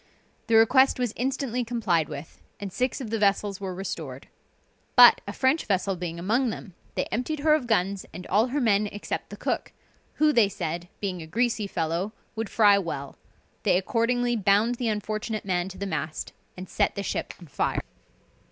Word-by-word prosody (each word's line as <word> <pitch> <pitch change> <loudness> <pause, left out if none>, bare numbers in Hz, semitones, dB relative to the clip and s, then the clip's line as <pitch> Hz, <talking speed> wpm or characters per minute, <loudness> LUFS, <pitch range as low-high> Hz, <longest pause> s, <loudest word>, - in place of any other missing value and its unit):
The 225 - +3
request 255 +4 +5
was 245 -4 -1
instantly 255 -1 -1
complied 210 -9 0
with, 150 +1 -9 0.2
and 200 -2 -6
six 255 +2 -1
of 225 -4 -6
the 225 - 0
vessels 200 -1 +1
were 190 -2 -4
restored. 160 -8 -6 0.7
But - - +9
a - - -3
French 265 +5 +2
vessel 195 -1 +1
being 170 -1 -5
among 230 +9 +1
them, 200 -3 -7 0.2
they - - 0
emptied 285 +6 -2
her 305 +1 +4
of 295 -6 +1
guns 195 -3 0
and 180 - -8
all 215 +5 +3
her 275 +4 -1
men 210 -4 +3
except 205 0 -5
the - - -9
cook, - - -2 0.4
who, 305 0 +3
they 225 -6 +5
said, 170 -1 -4
being 185 -4 -3
a 160 - -8
greasy 230 +2 0
fellow, 170 +4 -2 0.2
would 225 -2 -3
fry 205 -3 +5
well; 140 -7 -5 0.5
they - - +3
accordingly 240 +5 +1
bound 210 +2 +3
the 240 - 0
unfortunate 215 0 -2
man 180 -1 0
to 190 - -10
the 200 - -4
mast, 155 -4 -4 0.2
and 185 +1 -7
set - - 0
the 200 - -3
ship - - -3
on 175 - -12
fire. 145 - -1
205 Hz, 185 wpm, -26 LUFS, 180-240 Hz, 0.7 s, But